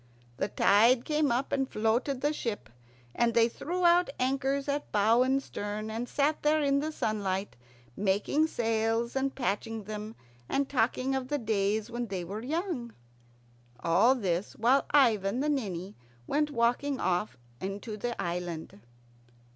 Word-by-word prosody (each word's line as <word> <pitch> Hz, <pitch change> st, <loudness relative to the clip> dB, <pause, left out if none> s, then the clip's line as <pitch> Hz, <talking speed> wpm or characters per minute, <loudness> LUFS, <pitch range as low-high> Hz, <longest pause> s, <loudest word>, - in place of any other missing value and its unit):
The 195 Hz, -, 0 dB
tide 230 Hz, +5 st, +4 dB
came 300 Hz, -2 st, +1 dB
up 250 Hz, +3 st, -1 dB
and 270 Hz, -1 st, 0 dB
floated 235 Hz, +5 st, 0 dB
the 295 Hz, +1 st, +1 dB
ship, 220 Hz, -, -4 dB, 0.4 s
and 235 Hz, -1 st, +1 dB
they 230 Hz, -1 st, +5 dB
threw 350 Hz, +9 st, -3 dB
out 345 Hz, +1 st, +5 dB
anchors 270 Hz, +2 st, 0 dB
at 285 Hz, +1 st, -2 dB
bow 220 Hz, +3 st, +4 dB
and 265 Hz, +2 st, +2 dB
stern, 210 Hz, 0 st, -5 dB
and 230 Hz, +3 st, -4 dB
sat 295 Hz, +2 st, +1 dB
there 305 Hz, +1 st, +3 dB
in 280 Hz, -1 st, +2 dB
the 310 Hz, +2 st, -2 dB
sunlight, 205 Hz, -7 st, -2 dB, 0.4 s
making 205 Hz, +10 st, +1 dB
sails 225 Hz, -2 st, 0 dB
and 270 Hz, 0 st, -1 dB
patching 225 Hz, -2 st, -2 dB
them 215 Hz, +2 st, -6 dB, 0.3 s
and 275 Hz, 0 st, +1 dB
talking 255 Hz, 0 st, 0 dB
of 265 Hz, -1 st, -2 dB
the 290 Hz, -, 0 dB
days 215 Hz, -1 st, 0 dB
when 240 Hz, 0 st, -3 dB
they 190 Hz, -3 st, -4 dB
were 200 Hz, +5 st, -5 dB
young. 290 Hz, -, -3 dB, 0.8 s
All 190 Hz, -, +4 dB
this 190 Hz, -5 st, -2 dB
while 250 Hz, +5 st, +3 dB
Ivan 230 Hz, -6 st, +3 dB
the 295 Hz, +2 st, 0 dB
Ninny 200 Hz, -, -2 dB, 0.3 s
went 295 Hz, -, +1 dB
walking 260 Hz, +2 st, 0 dB
off 180 Hz, -3 st, -1 dB, 0.2 s
into 200 Hz, +3 st, -5 dB
the 240 Hz, +3 st, -4 dB
island. 170 Hz, -8 st, -4 dB
235 Hz, 150 wpm, -29 LUFS, 205-275 Hz, 0.8 s, they